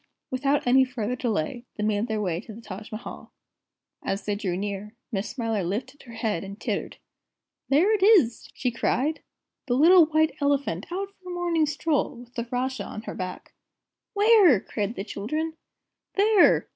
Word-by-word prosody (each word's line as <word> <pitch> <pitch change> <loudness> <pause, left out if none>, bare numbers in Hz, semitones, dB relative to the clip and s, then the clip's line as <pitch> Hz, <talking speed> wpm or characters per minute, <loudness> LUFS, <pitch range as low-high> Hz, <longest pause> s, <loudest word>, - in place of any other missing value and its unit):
Without 275 +2 +1
any 260 +2 +6
further 250 -2 -3
delay, 235 -2 -2
they 210 - -3
made 210 +1 +1
their 220 -2 -1
way 180 -4 -1
to 220 - -11
the - - -10
Taj 210 -1 -9
Mahal. 215 +1 -8 0.7
As 195 +2 -3
they 210 - 0
drew 195 -4 -2
near, 205 +2 -5 0.2
Miss 200 -2 -2
Smiler 225 -6 -2
lifted 245 +10 -4
her 235 - -12
head 220 -6 -2
and 200 +2 -8
tittered. - - -3 0.7
"There 340 +10 +4
it 420 - +1
is!" 380 - +4
she 250 - -1
cried, 265 +6 0 0.5
"the 245 - +1
little 330 +4 +7
White 315 0 +2
Elephant, 280 - 0
out 390 +2 -3
for 370 -2 -13
a - - -4
morning 340 -3 +1
stroll, 295 -1 0
with 240 0 -13
the 235 -1 -4
Rajah 255 +1 -2
on 215 - -7
her - - -6
back." 185 -1 -6 0.6
"Where?" 405 - +6
cried 210 +3 -3
the 195 - -4
children. 305 +11 -3 0.6
"There! 410 -1 +5
245 Hz, 170 wpm, -26 LUFS, 210-310 Hz, 0.7 s, little